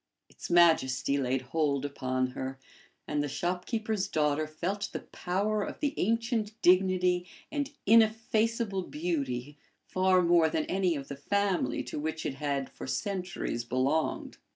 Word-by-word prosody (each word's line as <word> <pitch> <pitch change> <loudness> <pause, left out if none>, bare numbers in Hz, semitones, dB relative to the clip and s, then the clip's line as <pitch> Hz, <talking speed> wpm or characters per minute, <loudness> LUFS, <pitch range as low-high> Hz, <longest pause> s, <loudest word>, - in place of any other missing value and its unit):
Its - - -9
majesty 145 -5 +4
laid 130 0 0
hold 145 -4 +1
upon 130 -2 -1
her, 130 +1 -5 0.5
and 145 - 0
the 145 - -1
shopkeeper's 200 - -2
daughter 155 -3 +1
felt 185 +6 -3
the - - -4
power 205 +4 -1
of - - -5
the 290 -2 0
ancient 225 0 0
dignity 180 -1 +4 0.2
and 290 -1 -2
ineffaceable 225 -1 +3
beauty 145 -5 -3 0.3
far 185 -1 +3
more 170 -2 +4
than 155 0 -1
any 185 -3 +1
of 140 -2 -6
the 140 - -6
family 200 +6 0
to - - -5
which 160 +1 -3
it - - -1
had 140 -1 -2
for - - -8
centuries 185 - -3
belonged. 130 +6 -1
175 Hz, 140 wpm, -30 LUFS, 145-200 Hz, 0.5 s, majesty